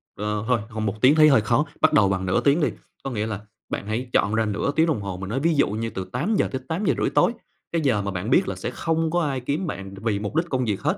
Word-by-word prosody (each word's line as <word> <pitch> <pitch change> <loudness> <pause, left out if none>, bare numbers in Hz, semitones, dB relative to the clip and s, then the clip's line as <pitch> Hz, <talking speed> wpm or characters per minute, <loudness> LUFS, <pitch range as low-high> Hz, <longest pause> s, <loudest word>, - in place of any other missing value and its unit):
Ờ, 105 +1 -2
thôi, 125 -2 +3
hông 110 -1 -3
1 105 +2 -3
tiếng 135 +4 +6
thấy 155 -1 +7
hơi 135 -6 +5
khó, 120 +7 +2 0.2
bắt 155 - +4
đầu 100 -2 +5
bằng 95 -1 -1
nửa 95 +1 +1
tiếng 145 +4 +3
đi, - - +3 0.4
có 135 - -3
nghĩa 105 -2 -2
là 105 -3 -4 0.3
bạn 100 - -4
hãy 120 +3 -3
chọn 100 +2 +2
ra 110 0 +2
nửa 105 +6 -1
tiếng 160 - +4
đồng 145 -10 0
hồ, 95 -2 -5
mình 95 +1 -6
nói 125 - -1
ví 160 +2 +2
dụ 140 - +3
như 115 +2 -3
từ 95 -4 -5
8:00-8:30 160 - 0
tối, - - +3 0.4
cái 165 -1 0
giờ 125 -8 +2
mà 100 0 -3
bạn 95 +5 -4
biết 175 +8 +4
là - - -3
sẽ - - -4
không 165 -1 -1
có 175 0 +1
ai 140 -4 -1
kiếm 145 +8 -2
bạn 95 -8 -6
đ - - -11
vì 105 -3 0
mục 105 +8 -5
đích 170 +1 +1
công 130 -2 0
việc 105 -4 -2
hết, - - 0
120 Hz, 285 wpm, -24 LUFS, 105-150 Hz, 0.4 s, thấy